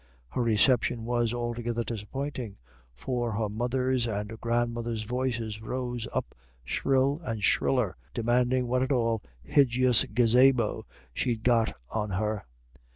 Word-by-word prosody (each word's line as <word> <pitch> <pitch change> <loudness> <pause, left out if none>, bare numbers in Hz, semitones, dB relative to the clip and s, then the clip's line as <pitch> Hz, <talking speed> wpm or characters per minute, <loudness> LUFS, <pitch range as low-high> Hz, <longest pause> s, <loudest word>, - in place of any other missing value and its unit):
Her 125 - -2
reception 115 +1 +3
was 120 -1 +1
altogether 120 -1 -2
disappointing. 120 +1 -5 0.4
For 120 - -2
her 105 0 -1
mother's 125 +2 0
and 105 +1 -4
grandmother's 115 -1 -1
voices 115 -2 -2
rose 120 0 -3
up - - -3 0.3
shrill 135 - +1
and 110 -6 -4
shriller, 120 -1 +2 0.2
demanding 125 +2 +1
what 125 +1 +1
at 130 - 0
all 115 -4 +1 0.3
hijjis 130 -3 +4
gazabo 125 -1 +4 0.3
she'd 115 - -1
got 115 -2 +3 0.2
on 105 -1 -1
her. 105 +2 -2
120 Hz, 120 wpm, -28 LUFS, 110-125 Hz, 0.4 s, hijjis